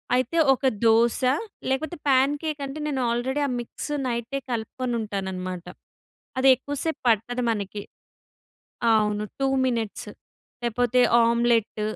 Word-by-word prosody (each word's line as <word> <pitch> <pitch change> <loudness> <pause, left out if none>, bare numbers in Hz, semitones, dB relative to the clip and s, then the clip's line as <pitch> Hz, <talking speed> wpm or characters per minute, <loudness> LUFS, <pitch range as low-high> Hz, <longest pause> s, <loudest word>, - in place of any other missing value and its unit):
అయితే 255 +6 0 0.2
ఒక 265 - -6 0.2
దోస 230 +1 +4 0.5
లేకపోతే 280 +5 -1
పా‌న్‌కే‌క్ 290 +3 +2
అంటే 275 +3 -6
నేను 275 -3 -1
ఆల్రెడీ 255 +5 -1
ఆ - - -3
మిక్స్ 240 +5 -6 0.2
నైట్ 235 +2 -2
కలుపుకొని 240 +2 -3
ఉంటాను 200 -3 -3
అన్నమాట. 185 -1 -5 0.7
అది 265 +1 +5
ఎక్కువ 285 +3 -6
సేపు 320 -1 -2
పట్టదు 240 +2 +1
మనకి. 205 -1 -4 1.1
అవును 210 -1 +2 0.2
టూ 270 - +2 0.2
మినిట్స్ 230 -4 -2 0.5
లేకపోతే 245 +1 +1 0.2
ఆమ్లెట్ 230 -2 +2
240 Hz, 120 wpm, -25 LUFS, 220-265 Hz, 1.1 s, అది